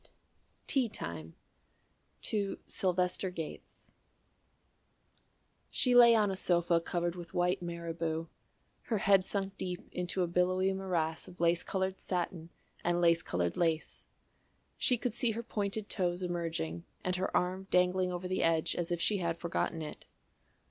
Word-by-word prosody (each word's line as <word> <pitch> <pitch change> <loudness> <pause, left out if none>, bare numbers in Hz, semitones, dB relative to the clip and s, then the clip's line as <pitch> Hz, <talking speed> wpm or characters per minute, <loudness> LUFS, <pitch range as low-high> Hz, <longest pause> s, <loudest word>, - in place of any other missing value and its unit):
VIII - - -17 0.6
TEA 260 -4 +2
TIME 85 - -7 0.9
[To 200 -2 0
SYLVESTER 180 0 0
GATES] 165 -4 -8 1.8
She 250 - +2
lay 240 -1 +9
on 210 -3 +3
a - - -2
sofa 175 -2 +2
covered 175 0 -1
with 175 -2 -9
white 180 0 +2
marabou, 165 -1 -3 0.6
her 225 - 0
head 195 -1 +5
sunk 195 0 -2
deep 180 -1 -4
into 180 +1 -1
a - - 0
billowy 185 +2 +2
morass 175 -4 -1
of 180 - -13
lace 170 0 +3
coloured 190 0 -2
satin 175 -2 -3 0.3
and 175 0 +2
lace 170 -1 +4
coloured 85 - -1
lace. 165 -2 -1 0.7
She 250 - +3
could 240 -1 -2
see 235 -1 +1
her 230 +2 -4
pointed 210 -2 -2
toes 180 -2 -1
emerging 165 - -2 0.2
and 180 0 0
her 185 - +1
arm 185 +2 -1
dangling 180 0 +3
over 180 +1 -4
the 185 - 0
edge 165 -1 +2
as 175 0 -2
if 175 - 0
she 205 +4 +3
had 170 -2 -1
forgotten 170 -1 -2
it. 150 - -8
180 Hz, 150 wpm, -32 LUFS, 170-190 Hz, 1.8 s, lay